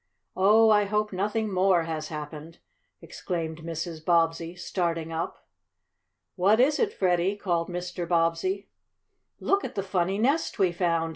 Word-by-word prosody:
"Oh, 215 +4 +5
I 210 -1 +4
hope 210 0 -1
nothing 210 +2 -1
more 185 -2 +3
has 160 -1 -4
happened!" 155 +1 -8 0.5
exclaimed 165 -3 -4
Mrs. 165 0 -5
Bobbsey, 165 0 +1
starting 170 -2 -2
up. 165 +1 -5 0.9
"What 200 +4 +3
is 290 +4 +3
it, 430 -2 +2
Freddie?" 185 - +1
called 175 -4 -1
Mr. 175 0 -4
Bobbsey. 170 +3 0 0.7
"Look 395 0 +1
at - - -6
the 195 - -1
funny 190 0 0
nest 275 +9 +1
we 190 -3 +3
found!" 170 -2 0
180 Hz, 140 wpm, -27 LUFS, 165-200 Hz, 0.9 s, Oh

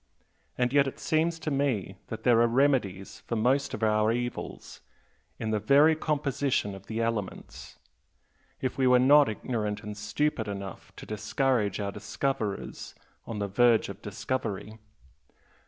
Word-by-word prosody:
And 125 0 +1
yet 140 -1 +5
it 135 - -5
seems 165 +1 0
to 155 -1 -4
me 130 -10 0
that 110 0 -7
there 120 -2 +5
are 120 - +5
remedies 115 -7 +1
for 115 - -1
most 130 +5 +1
of 110 - -6
our 110 0 +3
evils 120 +1 -5 0.6
in 110 -1 -3
the 110 - +1
very 145 +9 +5
composition 140 -8 -1
of 95 0 -11
the 115 +1 -2
elements 110 -4 -5 0.8
if 130 +1 -2
we 130 - +4
were 125 0 +6
not 140 +1 +6
ignorant 105 -2 -3
and 105 0 -6
stupid 110 +3 -1
enough 100 -1 -7
to - - -10
discourage 110 0 0
our 100 -1 -2
discoverers 115 -4 -3 0.3
on 115 - -4
the 100 -1 -1
verge 115 +2 +3
of 100 - -8
discovery. 105 0 -4
115 Hz, 150 wpm, -28 LUFS, 105-135 Hz, 0.8 s, were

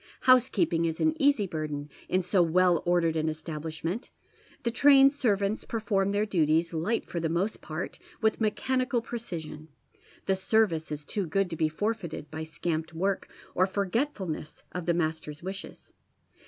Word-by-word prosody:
Housekeeping 210 -10 +4
is 160 -1 -2
an 315 0 +3
easy 280 -7 +4
burden 155 -4 -4 0.2
in 185 0 +2
so 180 +1 +3
well 175 0 +4
ordered 170 -2 +3
an 160 0 +1
establish 155 0 -6
ment. 185 +9 -3 0.5
The 235 - 0
trained 275 +2 +6
servants 210 -6 0
perf 220 -2 -5
oi 195 -1 +4
m 195 - +1
their 205 +1 +1
duties, 165 -3 +2
light 170 +9 0
for 170 - -4
the 165 -1 -1
most 185 +6 -1
part, 155 +3 -5 0.2
with 220 0 +1
mechanical 250 +3 0
precision. 165 -10 -6 0.6
The 190 - +2
service 190 -5 +1
is 150 0 -5
too 200 +1 -2
good 190 +2 0
to - - -2
be 155 -1 +1
forfeited 180 -3 -3
by 160 0 -4
scamped 160 +1 -3
work, 195 +3 -1 0.2
or 185 +1 +3
forgetfulness 195 - -2
of 180 -1 -5
the 170 - +3
master's 155 -2 -2
wishes. 190 +1 -8
180 Hz, 165 wpm, -28 LUFS, 160-215 Hz, 0.6 s, trained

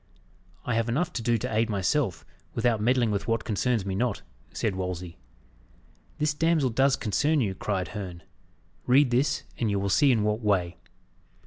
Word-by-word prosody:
"I 125 - -1
have 115 +1 0
enough 175 +9 0
to 120 - -3
do 115 0 +2
to 110 - -4
aid 115 +1 +2
myself, 100 - 0 0.3
without 115 -2 +1
meddling 120 0 +2
with 100 +1 -2
what 115 -1 0
concerns 115 0 0
me 95 - -2
not," 115 +2 -1 0.3
said 110 -4 -1
Wolsey. 90 -2 -5 1.0
"This 150 0 +1
damsel 155 -4 +2
does 135 +3 +3
concern 145 +8 +1
you," 105 -7 0
cried 95 -1 -2
Herne. 95 -5 -7 0.6
"Read 130 +1 +5
this, 140 +4 +1 0.2
and 115 - +1
you 100 -1 0
will 100 0 -1
see 140 +7 +4
in 110 -4 +2
what 105 +2 0
way." 90 -5 0
115 Hz, 175 wpm, -27 LUFS, 100-130 Hz, 1.0 s, Read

